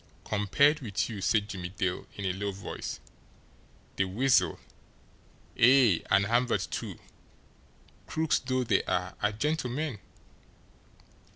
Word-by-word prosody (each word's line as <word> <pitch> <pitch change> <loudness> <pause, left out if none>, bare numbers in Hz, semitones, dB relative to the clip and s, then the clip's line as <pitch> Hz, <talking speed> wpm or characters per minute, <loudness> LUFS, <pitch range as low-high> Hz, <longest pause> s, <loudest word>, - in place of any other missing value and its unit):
"Compared 125 - +2
with 110 -6 -2
you," 105 -3 -6
said 105 +1 +2
Jimmie 90 -4 -5
Dale, 95 -2 -3
in 100 - -5
a 90 - 0
low 100 +2 -3
voice, 95 0 -6 1.0
"the 95 - +2
Weasel, 95 -4 +2 1.0
ay, 125 -7 +6
and 100 - +4
Hamvert, 120 +3 +1
too, - - -4 1.1
crooks 160 -1 +1
though 130 0 -1
they 120 - +2
are, 90 0 -1
are 105 - +2
gentlemen! 145 0 -2
105 Hz, 115 wpm, -29 LUFS, 95-130 Hz, 1.1 s, ay